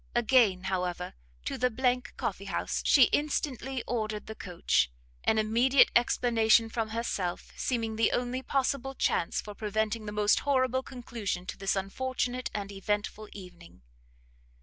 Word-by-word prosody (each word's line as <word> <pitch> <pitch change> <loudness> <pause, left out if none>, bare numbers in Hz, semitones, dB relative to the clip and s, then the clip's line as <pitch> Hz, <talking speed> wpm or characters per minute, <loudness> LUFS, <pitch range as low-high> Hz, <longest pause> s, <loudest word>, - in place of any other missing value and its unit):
Again, 230 -6 +4
however, 180 -2 -2 0.3
to - - -3
the 250 +1 +2 0.2
coffee - - -3
house - - -2
she 275 - +6
instantly 270 -3 -1
ordered 215 -3 -2
the 220 - -7
coach, 180 - 0 0.4
an 220 - +3
immediate 235 +5 +4
explanation 230 -2 +4
from 225 -1 -2
herself 215 -6 -3
seeming 225 -3 -2
the 225 - +3
only 250 +1 -1
possible 270 0 -1
chance 170 - 0
for 210 - -9
preventing 215 +1 -2
the - - -3
most 210 0 +3
horrible 260 -2 +1
conclusion 230 -8 -5
to - - -5
this 195 +1 -1
unfortunate 250 +5 -2
and 200 -1 -4
eventful 205 +2 -3
evening. 175 - -13
225 Hz, 135 wpm, -29 LUFS, 205-250 Hz, 0.4 s, she